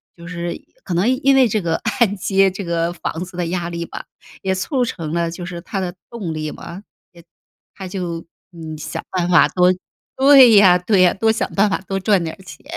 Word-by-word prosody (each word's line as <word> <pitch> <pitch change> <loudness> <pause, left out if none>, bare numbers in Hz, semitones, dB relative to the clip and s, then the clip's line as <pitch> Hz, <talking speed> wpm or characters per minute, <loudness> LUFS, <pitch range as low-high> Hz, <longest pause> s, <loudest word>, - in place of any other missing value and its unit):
就 170 0 -12
是 175 -1 -4 0.3
可 185 - -5
能 180 +7 +2
因 275 +1 +5
为 265 -2 +5
这 215 0 0
个 170 -4 -1
按 220 -5 0
揭 195 0 +2
这 195 +2 -6
个 170 -1 -1
房 175 0 -5
子 185 - -14
的 175 -1 -2
压 175 0 -3
力 170 0 -4
吧， - - -8 0.4
也 190 -1 0
促 245 +7 -1
成 165 -9 -5
了 170 0 -1
就 175 +1 -8
是 175 -1 -6
他 195 +3 -5
的 180 -1 -4 0.2
动 195 -9 -5
力 155 -1 -4
嘛， 175 +4 -10 0.3
也 170 -1 -16 0.5
他 190 - -8
就 175 -3 -5 0.3
嗯， 160 -3 -8
想 150 - -6
办 180 -2 -1
法 175 - +5
多 180 0 +3 0.4
对 270 -2 +7
呀， 200 -4 +7
对 185 +2 +2
呀， 180 -1 +5
多 220 +3 +2
想 220 - -2
办 205 +1 +4
法 200 - -1
多 195 0 -2
赚 195 -2 +2
点 160 -1 -5
儿 - - -15
钱， 185 - -13
180 Hz, 235 characters per minute, -19 LUFS, 170-200 Hz, 0.5 s, 对